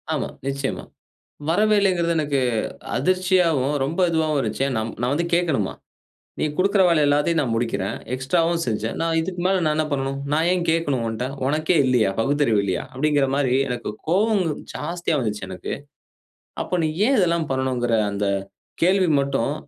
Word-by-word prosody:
ஆமா. -, -, -1 dB, 0.2 s
நிச்சயமா. 140 Hz, 0 st, -3 dB, 0.7 s
வரவேயில்லங்கிறது 190 Hz, -3 st, +2 dB
எனக்கு 145 Hz, -3 st, 0 dB, 0.6 s
அதிர்ச்சியாவும், 180 Hz, -6 st, +2 dB
ரொம்ப 165 Hz, +7 st, -2 dB
இதுவாவும் 160 Hz, -2 st, +1 dB
இருந்துச்சு. 135 Hz, -, -2 dB
ஏ -, -, -1 dB
நா -, -, 0 dB, 0.2 s
நான் 125 Hz, +1 st, +1 dB
வந்து 170 Hz, +4 st, 0 dB
கேட்கணுமா. 160 Hz, -, +1 dB, 0.7 s
"நீ -, -, 0 dB
குடுக்கற 195 Hz, +1 st, +3 dB
வேலை 165 Hz, -3 st, +3 dB
எல்லாத்தையும் 150 Hz, +3 st, +2 dB
நான் 120 Hz, -5 st, -1 dB
முடிக்கிறேன். 115 Hz, -4 st, -1 dB, 0.2 s
எக்ஸ்ட்ராவும் 165 Hz, +6 st, +1 dB
செஞ்சேன். 110 Hz, -1 st, -2 dB
நான் 165 Hz, 0 st, 0 dB
இதுக்கு 180 Hz, +2 st, -4 dB
மேல 190 Hz, 0 st, +2 dB
நான் 155 Hz, -1 st, +2 dB
என்ன 155 Hz, 0 st, +1 dB
பண்ணனும்? 135 Hz, 0 st, -2 dB
நான் 160 Hz, +3 st, +2 dB
ஏன் 180 Hz, -2 st, 0 dB
கேட்கணும் 145 Hz, -7 st, 0 dB
உன்ட்ட? 115 Hz, +3 st, -3 dB, 0.2 s
உனக்கே 155 Hz, +5 st, +1 dB
இல்லையா? 125 Hz, -6 st, +3 dB
பகுத்தறிவு 135 Hz, -4 st, +2 dB
இல்லையா?" 95 Hz, -3 st, -1 dB
அப்படிங்கிற 145 Hz, 0 st, +1 dB
மாரி 135 Hz, -3 st, +1 dB
எனக்கு 120 Hz, -4 st, -4 dB, 0.2 s
கோவம்ங்க 190 Hz, -2 st, +2 dB, 0.2 s
ஜாஸ்தியா 170 Hz, 0 st, -2 dB
வந்துச்சு 105 Hz, -4 st, -3 dB
எனக்கு. 95 Hz, -1 st, -6 dB, 0.9 s
அப்போ -, -, -2 dB
நீ 155 Hz, -, +1 dB, 0.2 s
ஏன் 270 Hz, 0 st, +3 dB
இதெல்லாம் 170 Hz, -4 st, +1 dB
பண்ணணுங்கிற 130 Hz, -2 st, 0 dB, 0.2 s
அந்த 100 Hz, 0 st, -2 dB, 0.6 s
கேள்வி 185 Hz, 0 st, +3 dB
மட்டும், 140 Hz, -1 st, 0 dB
150 Hz, 150 wpm, -22 LUFS, 130-170 Hz, 0.9 s, குடுக்கற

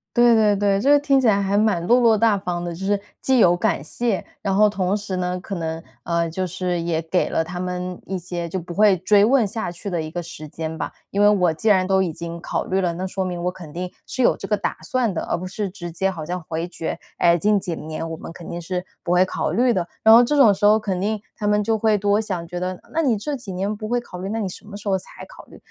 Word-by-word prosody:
对 240 Hz, -1 st, +6 dB
对 215 Hz, -2 st, +4 dB
对， 200 Hz, 0 st, +2 dB
这 270 Hz, +8 st, +2 dB
个 290 Hz, -, +7 dB
听 280 Hz, -1 st, +3 dB
起 260 Hz, -, +2 dB
来 200 Hz, -3 st, +4 dB
还 200 Hz, 0 st, 0 dB
蛮 205 Hz, -5 st, +2 dB
落 245 Hz, +4 st, +5 dB
落 230 Hz, -3 st, +4 dB
大 220 Hz, -1 st, +4 dB
方 175 Hz, -2 st, -3 dB
的。 175 Hz, -1 st, -4 dB
就 190 Hz, +3 st, -7 dB
是 200 Hz, 0 st, +1 dB, 0.2 s
既 265 Hz, -1 st, +3 dB
有 175 Hz, -6 st, +5 dB
感 175 Hz, -, 0 dB
谢， 215 Hz, +6 st, -2 dB, 0.2 s
然 195 Hz, -1 st, 0 dB
后 210 Hz, +2 st, +5 dB
同 195 Hz, -2 st, 0 dB
时 205 Hz, -2 st, -3 dB
呢， 180 Hz, 0 st, -2 dB
可 195 Hz, -, -6 dB
能， 165 Hz, -2 st, -4 dB, 0.2 s
呃， 170 Hz, 0 st, 0 dB
就 185 Hz, +3 st, -2 dB
是 180 Hz, 0 st, -2 dB
也 165 Hz, -1 st, 0 dB
给 165 Hz, +3 st, 0 dB
了 -, -, +1 dB
他 175 Hz, +2 st, -6 dB
们 180 Hz, 0 st, -4 dB
一 190 Hz, 0 st, -3 dB
些 175 Hz, -1 st, -5 dB
就 185 Hz, +2 st, -3 dB
不 170 Hz, 0 st, -8 dB
会 210 Hz, -1 st, +5 dB
追 200 Hz, +3 st, +4 dB
问 245 Hz, -2 st, +4 dB
下 195 Hz, -3 st, -4 dB
去 180 Hz, +4 st, -8 dB
的 175 Hz, -4 st, -1 dB
一 155 Hz, -, -6 dB
个 175 Hz, +1 st, -4 dB
时 160 Hz, -2 st, -9 dB
间 160 Hz, +1 st, -5 dB
吧。 -, -, -4 dB, 0.2 s
因 200 Hz, +1 st, +1 dB
为 205 Hz, -, +7 dB
我 180 Hz, -4 st, +3 dB
既 190 Hz, +8 st, -1 dB
然 185 Hz, -2 st, +4 dB
都 190 Hz, 0 st, +3 dB
已 175 Hz, -4 st, -1 dB
经 170 Hz, +1 st, -6 dB
考 -, -, -2 dB
虑 190 Hz, +1 st, 0 dB
了， 175 Hz, -2 st, +1 dB
那 180 Hz, +3 st, -4 dB
说 190 Hz, 0 st, -3 dB
明 175 Hz, -1 st, -4 dB
我 180 Hz, -, 0 dB
肯 170 Hz, -5 st, -11 dB
定 180 Hz, +1 st, -4 dB, 0.2 s
是 260 Hz, -, -5 dB
有 -, -, +4 dB
这 -, -, -7 dB
个 215 Hz, -, +1 dB
打 -, -, -2 dB
算 240 Hz, -6 st, 0 dB
的， -, -, -2 dB
而 -, -, -2 dB
不 185 Hz, -, -6 dB
是 195 Hz, +1 st, -3 dB
直 175 Hz, -3 st, -7 dB
接 190 Hz, +3 st, 0 dB
好 160 Hz, -4 st, -6 dB
像 180 Hz, +1 st, -4 dB
回 165 Hz, +1 st, -3 dB
绝， 165 Hz, -1 st, -4 dB, 0.2 s
“哎， 170 Hz, 0 st, +4 dB
近 210 Hz, +3 st, +3 dB
几 175 Hz, -3 st, -4 dB
年 155 Hz, +1 st, -5 dB
我 -, -, -3 dB
们 -, -, -8 dB
肯 170 Hz, -, -10 dB
定 175 Hz, -, -5 dB
是 180 Hz, +1 st, -3 dB, 0.2 s
不 175 Hz, -, -1 dB
会 180 Hz, +1 st, +5 dB
考 -, -, -2 dB
虑 245 Hz, +1 st, +3 dB
的”。 180 Hz, -4 st, -1 dB, 0.2 s
然 220 Hz, 0 st, +9 dB
后 235 Hz, -, +9 dB
这 295 Hz, +5 st, +1 dB
种 245 Hz, -7 st, +7 dB
时 205 Hz, +1 st, +1 dB
候 210 Hz, +1 st, +6 dB
肯 195 Hz, -4 st, -2 dB
定 215 Hz, +3 st, 0 dB, 0.2 s
他 210 Hz, -, -4 dB
们 210 Hz, 0 st, +2 dB
就 220 Hz, +1 st, +1 dB
会 215 Hz, 0 st, +3 dB
多 205 Hz, +1 st, +2 dB
想， 185 Hz, -6 st, -4 dB
觉 175 Hz, +1 st, -5 dB
得 185 Hz, 0 st, -3 dB
那 325 Hz, -, +1 dB
你 260 Hz, -8 st, +2 dB
这 290 Hz, +8 st, -3 dB
几 245 Hz, -6 st, -8 dB
年 195 Hz, +3 st, -1 dB
不 215 Hz, 0 st, -6 dB
会 245 Hz, +1 st, +1 dB
考 210 Hz, -6 st, -8 dB
虑， 190 Hz, +2 st, -4 dB
那 225 Hz, +2 st, -2 dB
你 205 Hz, -, -1 dB
什 180 Hz, -, -11 dB
么 205 Hz, -1 st, -9 dB
时 205 Hz, 0 st, -4 dB
候 190 Hz, -, +2 dB
才 -, -, -12 dB
考 -, -, -14 dB
虑？ -, -, -15 dB
190 Hz, 310 characters per minute, -22 LUFS, 175-210 Hz, 0.2 s, 然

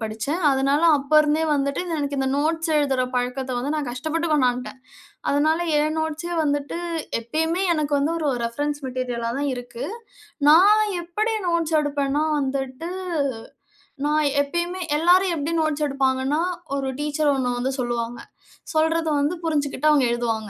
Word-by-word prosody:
படிச்சேன். 225 Hz, +10 st, -3 dB
அதனால 275 Hz, +2 st, +2 dB
அப்ப 280 Hz, 0 st, -6 dB
இருந்தே 305 Hz, +1 st, +1 dB
வந்துட்டு 280 Hz, -1 st, 0 dB, 0.2 s
எனக்கு 285 Hz, -1 st, -2 dB
இந்த 265 Hz, 0 st, +1 dB
நோட்ஸ் 320 Hz, +3 st, 0 dB
எழுதுற 275 Hz, -4 st, +2 dB
பழக்கத்த 250 Hz, +1 st, -2 dB
வந்து 270 Hz, +5 st, -2 dB
நான் 300 Hz, -4 st, -2 dB
கஷ்டப்பட்டு 315 Hz, +7 st, -2 dB
கொண்டான்ட்டேன். 250 Hz, -3 st, 0 dB, 0.5 s
அதனால 310 Hz, +3 st, +2 dB, 0.2 s
என் 305 Hz, +1 st, +1 dB
நோட்ஸே 320 Hz, +2 st, -3 dB
வந்துட்டு, 290 Hz, +2 st, -1 dB, 0.4 s
எப்பயுமே 320 Hz, +9 st, -1 dB
எனக்கு 300 Hz, -2 st, -2 dB
வந்து 295 Hz, +4 st, +1 dB
ஒரு 310 Hz, -3 st, -1 dB
ரெஃபரன்ஸ் 290 Hz, +5 st, -2 dB
மெட்டீரியலா 250 Hz, -2 st, -3 dB
தான் 285 Hz, 0 st, -1 dB
இருக்கு. 245 Hz, -1 st, -7 dB, 0.6 s
நான் 400 Hz, +7 st, +7 dB, 0.2 s
எப்படி 420 Hz, +7 st, -1 dB
நோட்ஸ் 335 Hz, -2 st, 0 dB
எடுப்பேன்னா 290 Hz, 0 st, 0 dB
வந்துட்டு, 270 Hz, +3 st, -3 dB, 1.2 s
நான் 300 Hz, 0 st, +2 dB
எப்பயுமே 345 Hz, +5 st, -2 dB, 0.2 s
எல்லாரும் 360 Hz, +2 st, +4 dB
எப்படி 300 Hz, +3 st, -2 dB
நோட்ஸ் 310 Hz, -1 st, 0 dB
எடுப்பாங்கன்னா, 270 Hz, +2 st, 0 dB, 0.4 s
ஒரு 270 Hz, -1 st, -2 dB
டீச்சர் 295 Hz, 0 st, +1 dB
ஒண்ணு 250 Hz, -2 st, -1 dB
வந்து 260 Hz, +2 st, -1 dB
சொல்லுவாங்க. 240 Hz, -1 st, -2 dB, 0.6 s
சொல்றதை 320 Hz, 0 st, +2 dB
வந்து 290 Hz, +4 st, +1 dB
புரிஞ்சுகிட்டு 305 Hz, 0 st, +1 dB
அவங்க 285 Hz, -4 st, +4 dB
எழுதுவாங்க. 225 Hz, -3 st, -2 dB
290 Hz, 140 wpm, -23 LUFS, 260-315 Hz, 1.2 s, நான்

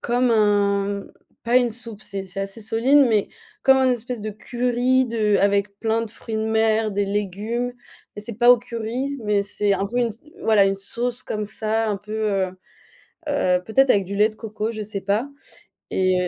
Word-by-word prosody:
comme 245 Hz, +1 st, +1 dB
un 200 Hz, -2 st, +2 dB, 0.4 s
pas 240 Hz, +2 st, +3 dB
une 245 Hz, -2 st, +1 dB
soupe, 225 Hz, -2 st, -9 dB
c'est 195 Hz, -1 st, -5 dB
c'est 195 Hz, +2 st, -5 dB
assez 195 Hz, +3 st, -5 dB
solide, 250 Hz, +6 st, +4 dB
mais 215 Hz, -3 st, +2 dB, 0.3 s
comme 265 Hz, 0 st, +6 dB
un 260 Hz, -1 st, +3 dB
espèce 240 Hz, -1 st, -4 dB
de 215 Hz, +1 st, -4 dB
curry 245 Hz, +4 st, +1 dB
de 215 Hz, -3 st, +1 dB
avec 200 Hz, 0 st, +1 dB
plein 225 Hz, 0 st, 0 dB
de 220 Hz, -, -6 dB
fruits 225 Hz, 0 st, -8 dB
de 220 Hz, -, -1 dB
mer, 220 Hz, 0 st, +2 dB
des 200 Hz, 0 st, 0 dB
légumes, 210 Hz, +5 st, -2 dB, 0.4 s
mais 210 Hz, -, -6 dB
c'est 235 Hz, -, -6 dB
pas 240 Hz, +2 st, +5 dB
au 245 Hz, -, +7 dB
curry, 245 Hz, +4 st, -4 dB
mais 205 Hz, -1 st, +1 dB
c'est 205 Hz, 0 st, 0 dB
un 195 Hz, 0 st, 0 dB
peu 240 Hz, +4 st, -3 dB
une 240 Hz, -1 st, +2 dB
s 225 Hz, +2 st, -10 dB, 0.2 s
voilà, 210 Hz, -3 st, +5 dB
une 195 Hz, 0 st, +2 dB
sauce 240 Hz, +5 st, -3 dB
comme 210 Hz, -1 st, -3 dB
ça, 220 Hz, +1 st, -1 dB
un 205 Hz, -, 0 dB
peu, 210 Hz, +2 st, -10 dB, 0.2 s
heu, 190 Hz, -1 st, 0 dB, 0.8 s
heu, 180 Hz, -10 st, +2 dB
peut-être 265 Hz, +5 st, +3 dB
avec 200 Hz, -5 st, +4 dB
du 200 Hz, +2 st, -6 dB
lait 210 Hz, +2 st, +4 dB
de 215 Hz, -, -12 dB
coco, 215 Hz, 0 st, -4 dB
je 215 Hz, -1 st, -5 dB
sais 205 Hz, -1 st, -4 dB
pas 200 Hz, +7 st, 0 dB, 0.6 s
et 185 Hz, -1 st, +1 dB
215 Hz, 200 wpm, -22 LUFS, 200-235 Hz, 0.8 s, au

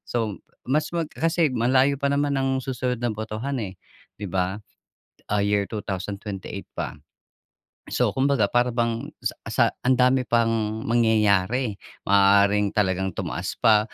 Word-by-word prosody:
So, 110 Hz, -4 st, -2 dB, 0.3 s
mas 150 Hz, +4 st, +1 dB
mag 165 Hz, -2 st, -1 dB
kasi 165 Hz, +2 st, +1 dB
malayo 130 Hz, +3 st, +2 dB
pa 140 Hz, -, 0 dB
naman 140 Hz, 0 st, +1 dB
ang 135 Hz, 0 st, 0 dB
susunod 125 Hz, -2 st, -2 dB
na 120 Hz, -, +1 dB
botohan, 110 Hz, +5 st, -4 dB
eh, 95 Hz, -1 st, -6 dB, 0.4 s
di 105 Hz, -, -5 dB
ba? 95 Hz, +1 st, -1 dB, 0.7 s
Ah, 105 Hz, -, +2 dB
year 100 Hz, -1 st, +1 dB
2028 100 Hz, -1 st, -5 dB
pa. -, -, -4 dB, 1.0 s
So -, -, +1 dB
kumbaga, 135 Hz, -4 st, +2 dB
para 120 Hz, +1 st, +2 dB
bang 115 Hz, -1 st, -1 dB
sa -, -, -1 dB, 0.2 s
sa -, -, +3 dB, 0.2 s
ang 130 Hz, 0 st, +4 dB
dami 130 Hz, +1 st, +4 dB
pang 115 Hz, -2 st, +1 dB
mangyayari. 110 Hz, 0 st, +2 dB, 0.3 s
Maaaring 100 Hz, +1 st, +4 dB
talagang 95 Hz, -2 st, +1 dB
tumaas -, -, -3 dB
pa 105 Hz, -1 st, +4 dB
115 Hz, 140 wpm, -24 LUFS, 100-130 Hz, 1.0 s, ang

